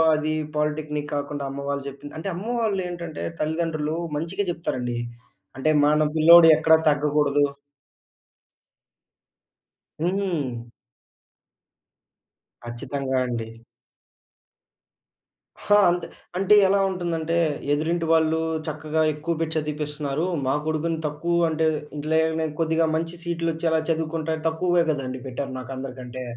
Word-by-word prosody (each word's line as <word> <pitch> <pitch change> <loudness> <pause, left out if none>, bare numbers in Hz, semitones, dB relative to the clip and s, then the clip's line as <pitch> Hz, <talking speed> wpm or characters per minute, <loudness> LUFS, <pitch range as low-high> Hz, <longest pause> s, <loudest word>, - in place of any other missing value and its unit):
అది 155 0 -1 0.2
పాలిటెక్నిక్ 150 0 -2
కాకుండా, 145 0 -3
అమ్మవాళ్ళు 140 0 -3
జెప్పింది. 140 +1 -9
అంటే 165 +5 -4
అమ్మ 195 +6 -6
వాళ్ళు 205 -4 0
ఏంటంటే, 170 -3 -6 0.2
తల్లిదండ్రులు 155 -1 -1 0.2
మంచిగా 170 +6 -2
జెప్తారండి. 125 -8 -3 0.6
అంటే 155 +4 +2
మన 150 +1 +3
పిల్లోడు 165 +1 +8
ఎక్కడా 160 0 +5
తగ్గగూడదు. 145 -1 +2 2.6
హ్మ్. 170 -10 -1 2.0
ఖ‌‌‌‌‌చ్చితంగా 130 +3 -4
అండి. 115 -2 -3 2.1
హా! 205 - +4
అంతే, 175 -1 -1 0.3
అంటే 195 +2 +4
ఎలా 200 +1 +3
ఉంటుందంటే 170 -3 -2 0.4
ఎదురింటి 165 +3 0
వాళ్ళు 160 0 +3 0.3
చక్కగా 155 +1 -1
ఎక్కువ 155 +3 -2
బెట్టి 160 -1 -1
చదివిపిస్తున్నారు. 150 0 -2 0.2
మా 130 - +2
కొడుకుని 160 +1 -1
తక్కువ 170 +3 0
అంటే, 160 0 0 0.3
ఇంట్లో 155 +2 -1
ఏమైనా 160 0 0
కొద్దిగా 160 0 +2
మంచి 165 +1 -2
సీట్లు 170 -1 -1
వచ్చేలా 160 0 +1
చదువుకుంటే, 160 0 -1
తక్కువగా 175 +2 +2
కదండీ 130 -4 -2
పెట్టారు 135 +1 -4
నాకు 130 +1 -8
అందరికంటే. 130 -1 -7
155 Hz, 105 wpm, -24 LUFS, 145-165 Hz, 2.6 s, పిల్లోడు